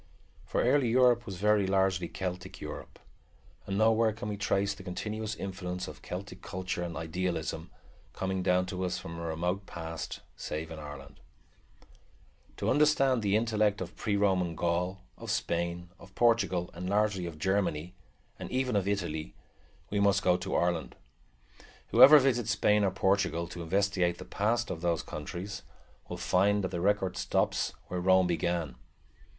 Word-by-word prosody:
For - - 0
early 140 -5 +3
Europe 120 0 +4
was 95 - -5
very 105 0 +3
largely 95 -2 +2
Celtic 90 +1 -5
Europe, - - -8 0.7
and 100 0 -1
nowhere 110 +1 +4
can 105 -1 -6
we 105 - -2
trace 100 0 0
the 100 - -12
continuous 105 +4 -4
influence 90 -2 -5
of - - -10
Celtic 95 0 -7
culture 90 -1 -4
and 85 -1 -4
idealism, 80 0 -3 0.4
coming 95 0 -2
down 90 0 +2
to 90 0 -4
us 90 - -1
from 85 0 -7
a - - -6
remote 90 +4 -2
past, 80 -1 -6
save 80 +2 -5
in 80 - -7
Ireland 70 -2 -10
only. - - -30
To - - -1
understand 135 -4 +3
the 100 -1 +1
intellect 110 -2 +2
of 90 0 -6
pre 105 - -1
Roman 95 -4 +1
Gaul, 90 +3 -1 0.2
of - - -7
Spain, 85 0 -2
of 95 -1 -15
Portugal, 115 -7 +2
and 90 +2 -5
largely 100 -3 +1
of 80 -2 -8
Germany, 90 -2 0 0.5
and - - -6
even 130 -2 0
of 100 -1 +1
Italy, 85 -6 -2 0.6
we 100 - +1
must 100 0 +3
go 90 -1 +4
to 90 +1 -3
Ireland. 85 -8 0 0.9
Whoever 150 +2 +9
visits 120 -5 +2
Spain 105 -1 +3
or 100 - +3
Portugal, 95 -3 +1
to 85 0 -7
investigate 90 0 +1
the 90 - -9
past 110 +5 0
of 80 - -5
those 85 -2 0
countries, 95 +6 -6 0.5
will - - -4
find 100 +2 +2
that 95 - -2
the 85 -2 -3
record 95 -1 +1
stops - - 0
where 90 - -3
Rome 95 0 +5
began. 85 -5 -1
95 Hz, 160 wpm, -30 LUFS, 85-105 Hz, 0.9 s, Whoever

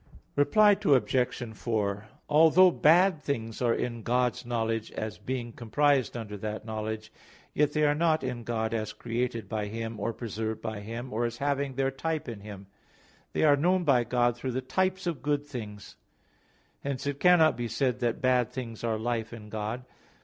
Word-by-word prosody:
Reply 205 +9 +5
Obj. 125 - +1
4: 105 -2 -2 0.2
Although 165 +5 +6
bad 175 +1 +4
things 115 -7 -3
are 120 -2 +3
in 120 -2 -3
God's 125 0 0
knowledge, 115 -2 -1
as 110 0 -5
being 120 -3 -4
comprised 135 +2 +1
under 105 -3 -6
that 105 +1 -5
knowledge, 110 0 -5 0.4
yet 150 0 +2
they 150 - +2
are 145 - +4
not 160 0 +2
in 120 -1 -3
God 110 -1 -2
as 110 -2 -2
created 115 -2 -3
by 105 0 -2
Him, 115 +1 -5
or 115 - -1
preserved 110 -1 -4
by 110 -2 -5
Him, 115 +4 -6
or 120 +2 0
as 120 0 -3
having 140 0 -1
their 135 0 +1
type 155 +3 -3
in 115 -4 -6
Him. 100 -1 -9 0.7
They - - +1
are 145 -2 +6
known 180 +5 +2
by 135 -6 +4
God 120 0 +1
through 125 +1 -4
the 130 - -1
types 185 +7 -1
of 165 -8 -2
good 145 +1 0
things. 105 -8 -8 0.8
Hence 140 -1 -4
it 140 0 -2
cannot 175 -4 +5
be 120 0 -3
said 125 -1 0
that 120 -1 -1
bad 125 -2 +3
things 115 -4 -6
are 115 -2 0
life 115 0 -2
in 110 -3 -10
God. 110 +4 -4
120 Hz, 180 wpm, -28 LUFS, 110-145 Hz, 0.8 s, Although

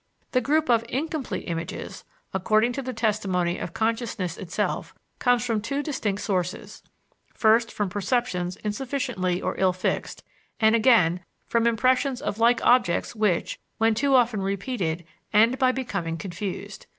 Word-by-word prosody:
The 255 - +2
group 305 +5 +1
of 230 -2 +3
incomplete 300 +1 -3
images, 165 -1 -5 0.3
according 215 +5 +2
to 275 - -3
the 255 -1 -4
testimony 195 -7 0
of 170 - -6
consciousness 225 -6 -1
itself, 185 -3 -3 0.2
comes 245 -1 +2
from 225 -3 0
two 275 +6 -2
distinct 210 -10 -2
sources 185 -3 -3 0.5
first, 225 +1 +3
from 205 - -1
perceptions 190 -2 -1
insufficiently 210 -5 -2
or 185 - -2
ill 185 -1 +3
fixed; 185 - -3 0.4
and 220 0 +5
again, 215 -8 +4 0.3
from 235 0 +1
impressions 255 +3 +2
of 230 -6 -4
like 235 +2 +3
objects 240 -4 +3
which, 210 -6 0 0.2
when 225 0 +3
too 275 +4 +2
often 235 -5 +3
repeated, 195 -4 -2 0.3
end 230 +5 +4
by 255 -2 +4
becoming 195 -11 -3
confused. 185 +2 -6
220 Hz, 140 wpm, -25 LUFS, 185-250 Hz, 0.5 s, and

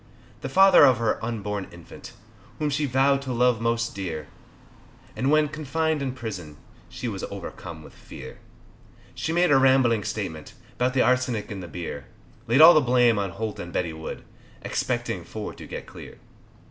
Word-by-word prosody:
The - - -4
father 190 +4 +7
of 130 -4 +6
her 115 -1 -1
unborn 105 -4 -3
infant, 85 -1 -12 0.4
Whom 150 -1 -1
she 145 +1 0
vowed 135 +2 +2
to 135 -2 -5
love 125 -1 +2
most 115 0 0
dear, 80 -6 -5 0.9
And 130 - 0
when 155 0 +4
confined 155 +1 -2
in 130 -2 -2
prison, 95 - -7 0.3
She - - -6
was - - -5
overcome 80 -2 -8
with - - -14
fear, - - -11 0.7
She 160 - -3
made 175 0 +3
a 135 - +6
rambling 130 -5 +4
statement 100 -8 -5 0.2
'Bout 125 +1 +1
the 130 - +4
arsenic 125 -4 0
in 100 - -5
the 90 - -7
beer 80 -5 -7 0.4
Laid 125 +6 +4
all 165 +2 +11
the 155 - +5
blame 120 -4 +3
on 100 -1 -1
Holt 105 +3 -5
and 90 - -7
Betty 85 -2 -2
Wood 80 0 -7 0.4
Expecting - - -2
for - - -7
to - - -11
get - - -7
clear. - - -12
120 Hz, 170 wpm, -25 LUFS, 100-135 Hz, 0.9 s, all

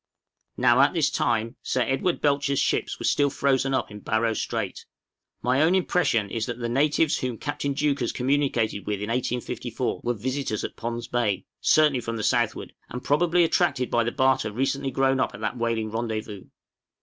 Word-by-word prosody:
Now - - +5
at - - +3
this - - +2
time 115 +3 0
Sir 130 - -1
Edward 135 +8 0
Belcher's 140 -1 +1
ships - - 0
were - - -5
still 145 -1 +3
frozen 135 -1 +1
up 130 - -2
in 105 - -8
Barrow 110 +2 0
Strait. - - -3 0.6
My 130 +3 +2
own 165 +4 +4
impression 145 - +1
is 115 0 -2
that 120 - -4
the 120 -1 -3
natives 150 +5 +2
whom 125 -3 -3
Captain 145 0 -3
Deuchars 145 -1 0
communicated 125 -6 0
with 105 - 0
in 105 +1 -4
1854 125 0 -2
were 120 0 0
visitors 130 0 -2
at - - -5
Pond's 120 0 -4
Bay 105 -6 -1
certainly 150 -5 +4
from 115 0 -4
the 110 - -3
southward - - 0 0.2
and 125 +1 -6
probably 170 +4 +3
attracted 165 -6 +1
by 120 - +3
the 120 - -1
barter 130 -4 +2
recently 135 +4 -1
grown 135 +1 +1
up - - 0
at 100 - -11
that 110 +3 -2
whaling 115 -2 -1
rendezvous. 110 -3 -4
125 Hz, 180 wpm, -25 LUFS, 115-140 Hz, 0.6 s, Now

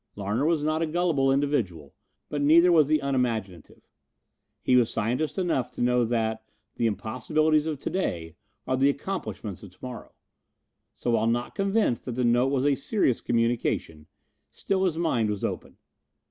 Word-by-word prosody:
Larner 105 +8 -1
was 160 -3 +1
not 155 +1 0
a 165 - +1
gullible 155 -5 +1
individual, 115 - -1 0.3
but 145 - -3
neither 170 +5 +6
was 155 -4 +5
he 155 +1 +3
unimaginative. 115 - -3 0.8
He 125 - +3
was 120 -2 +4
scientist 120 - -1
enough 165 -10 0
to - - -6
know 125 0 +3
that 110 -1 -1 0.3
"the 115 - +2
impossibilities 155 - 0
of 155 -2 -2
to - - -3
day 85 - -3 0.3
are 130 - 0
the 135 +2 +3
accomplishments 140 - -4
of 100 - -11
to 90 - -24
morrow." 125 -2 -8 0.8
So 120 - -2
while 115 -1 +2
not 120 +1 -1
convinced 195 - 0
that 125 - -4
the 125 +2 -1
note 120 +2 +3
was 135 -1 0
a 145 - +4
serious 140 - 0
communication, 115 -9 -1 0.4
still 190 -1 -1
his 165 -4 0
mind 125 -10 +1
was 105 -2 -2
open. - - -5
130 Hz, 165 wpm, -26 LUFS, 115-155 Hz, 0.8 s, neither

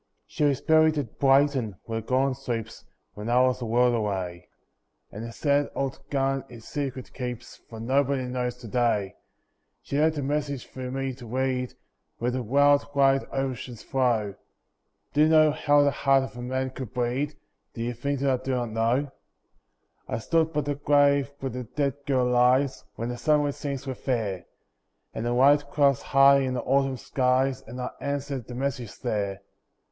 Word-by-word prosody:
She - - -3
was 140 -3 +2
buried 160 -1 +4
at 135 -8 -4
Brighton, 135 -5 +3
where 115 -1 -3
Gordon 130 +4 +1
sleeps, 120 -4 -5 0.3
When 105 +2 -6
I 120 +1 +4
was 130 0 +2
a - - -2
world 120 +2 +3
away; 95 -6 -3 0.6
And 105 - -7
the 115 - -6
sad 145 +3 +1
old 135 -1 -2
garden 135 -1 0
it's 115 -2 -12
secret 135 -3 -4
keeps, 125 -3 -6
For 115 - -9
nobody 135 +3 +1
knows 125 -1 -3
to 125 -2 -10
day. 110 -4 0 0.7
She 140 - -2
left 160 0 +2
a 145 - -2
message 140 -1 -2
for 130 -1 -7
me 135 0 -3
to 120 -1 -11
read, 130 +1 -1 0.4
Where 120 +2 -1
the 130 +1 -2
wild 140 +4 +3
wide 135 -1 +4
oceans 130 -3 -4
flow; 120 -7 0 0.8
Do 150 - +3
you 155 - +5
know 155 -1 +6
how 145 -1 +3
the 140 - +3
heart 135 -1 +3
of 130 - -8
a 120 - -7
man 130 +1 -2
can 130 0 -6
bleed— 125 +6 -2 0.4
Do 115 - -3
you 120 +1 -2
think 140 +3 -3
that 135 -2 +1
I - - -16
do 130 -1 -1
not 120 -2 -2
know? 120 +6 0 1.0
I - - -2
stood 160 +7 +1
by 150 -1 0
the 145 +1 -2
grave 140 -1 +3
where 135 -1 -3
the 125 -1 -5
dead 140 +3 -1
girl 130 -3 +2
lies, 125 +2 +2
When 115 +1 -4
the 120 - -4
sunlit 145 0 +2
scenes 140 -1 -5
were 135 - -3
fair, 110 -8 -3 0.7
And 115 - -3
the 120 - 0
white 140 +3 +4
clouds 140 -3 +3
high 140 0 +5
in 130 -1 -1
the 125 - -2
autumn 135 -1 +1
skies, 130 +1 +1
And 125 +3 -8
I 125 - -3
answered 140 -3 -3
the 125 - -7
message 130 -4 -3
there. 100 -5 -2
130 Hz, 185 wpm, -26 LUFS, 120-140 Hz, 1.0 s, know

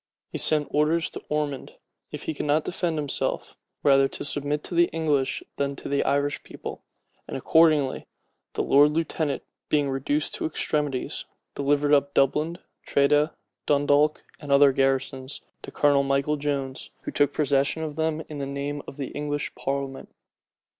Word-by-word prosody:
He - - -3
sent 150 -2 +4
orders 155 +3 +1
to - - -7
Ormond, 150 -3 -2 0.4
if - - -6
he - - -2
could 150 - -4
not 150 +2 +3
defend 170 -3 -1
himself, 145 -2 -2 0.3
rather 135 -1 +5
to - - -6
submit 145 +1 -1
to - - -6
the 170 0 +5
English 150 -4 0
than 140 0 -1
to - - -8
the 140 0 +1
Irish 145 +1 0
rebels; - - -7 0.5
and - - -4
accordingly 155 -5 +3 0.5
the - - -1
lord 145 +2 +6
lieutenant, 155 -2 -1 0.3
being 145 -2 +2
reduced 145 +3 -1
to - - -1
extremities, 150 -4 -2 0.3
delivered 145 +1 +1
up 140 0 +3
Dublin, 150 +5 +2 0.3
Tredah, 145 +2 +3 0.3
Dundalk, 145 +1 +3 0.2
and 145 -2 -6
other 140 0 +7
garrisons, 135 0 -1 0.2
to - - -8
Colonel 145 -1 +3
Michael 140 +2 +1
Jones, 140 -2 -3
who - - -4
took 145 -1 +2
possession 145 +2 +1
of 150 -2 -4
them 160 0 -1
in 150 -2 -7
the 140 - -3
name 140 +1 -4
of 135 - -9
the 135 -3 -4
English 145 0 -3
parliament. 135 -1 -4
145 Hz, 160 wpm, -25 LUFS, 140-150 Hz, 0.5 s, other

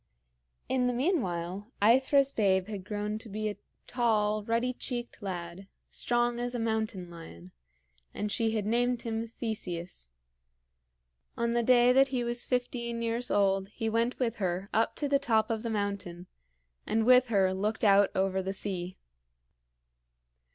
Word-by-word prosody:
In 255 -1 +1
the 250 - +1
meanwhile 205 - -1
AEthra's 265 +5 +4
babe 190 -5 +2
had 200 -3 -5
grown 210 +1 -3
to 225 - -10
be 215 +1 -3
a 205 - -6 0.3
tall, 215 -4 +1
ruddy 230 +3 0
cheeked 240 -1 -6
lad, 180 -1 -6 0.2
strong 240 0 0
as 245 0 -2
a - - -1
mountain 220 -5 -2
lion; 90 - -11 0.6
and 210 0 -3
she 225 +1 +1
had 210 -2 -1
named 240 +2 +1
him 225 -1 -3
Theseus. 185 - -5 1.3
On 235 0 0
the 240 - +2
day 245 +1 +5
that 270 +1 +5
he 255 -2 -1
was 240 0 -2
fifteen 235 -2 -2
years 230 +1 -1
old 195 -1 +2
he 225 +2 -3
went 230 +2 0
with 235 -3 -1
her 185 0 -2
up 225 +1 +1
to 290 - -1
the 280 0 +3
top 230 -5 +1
of 220 -1 -1
the 230 - -3
mountain, 200 -5 -3 0.6
and 220 +1 +1
with 250 +1 +6
her 195 -4 +2
looked 210 +4 -2
out 200 -1 +6
over 190 0 +1
the 190 +1 -3
sea. 185 -2 -4
220 Hz, 155 wpm, -30 LUFS, 195-240 Hz, 1.3 s, with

